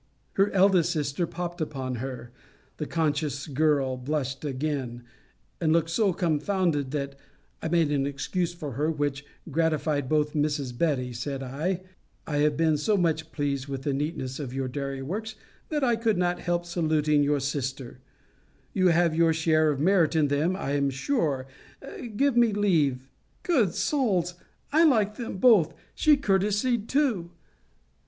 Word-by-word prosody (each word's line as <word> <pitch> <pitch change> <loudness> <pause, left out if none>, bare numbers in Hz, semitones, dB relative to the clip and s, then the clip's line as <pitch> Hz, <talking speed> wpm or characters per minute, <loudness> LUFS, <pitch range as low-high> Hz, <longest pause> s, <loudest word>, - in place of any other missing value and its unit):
Her 195 +1 +3
eldest 185 -3 +4
sister 155 +1 -1
popt 175 0 -5
upon 130 -5 -3
her. 125 -1 -6 0.5
The 150 - -4
conscious 150 -3 -1
girl 140 -3 +1
blushed 135 0 -3
again, 135 -4 -3 0.6
and 160 -2 +1
looked 165 0 +2
so 200 +2 +2
confounded, 165 -3 0
that 140 -1 -4 0.4
I - - -2
made 165 -2 +2
an 140 -1 +1
excuse 170 +5 -2
for 155 -5 -6
her, 145 +6 -1
which 145 -3 -2 0.3
gratified 155 -3 0
both. 150 -1 +1
Mrs. 145 -4 -1
Betty, 125 -4 0
said 135 +3 -4
I, 155 +8 -2 0.4
I 150 - -2
have 150 0 +2
been 160 -2 +3
so 205 +8 +1
much 160 -3 0
pleased 140 -2 -2
with 135 -1 -5
the 145 - 0
neatness 135 -2 -3
of 130 -3 -5
your 135 -1 -1
dairy 135 +1 -4
works, 215 +9 -4 0.3
that 300 -3 -1
I 240 -3 +3
could 225 -2 +1
not 180 0 0
help 175 0 -1
saluting 155 -3 +1
your 145 0 +2
sister: 135 -2 -4 0.7
you 185 -1 +3
have 170 -1 +3
your 165 0 +3
share 155 -1 +3
of 145 -2 -1
merit 170 0 +3
in 150 -3 +3
them, 155 +6 +1
I 165 -7 -3
am 140 -1 +1
sure 140 - -1 0.7
Give 275 +2 +2
me 235 -3 +4
leave 160 -11 +2 0.4
Good 230 - +2
souls! 195 - +1 0.4
I 320 +2 +6
like 215 -9 +3
them 235 -5 -5
both 190 -7 +5 0.2
she 300 -2 +4
courtesied 210 +1 +1
too! 245 - +1
155 Hz, 155 wpm, -27 LUFS, 140-180 Hz, 0.7 s, I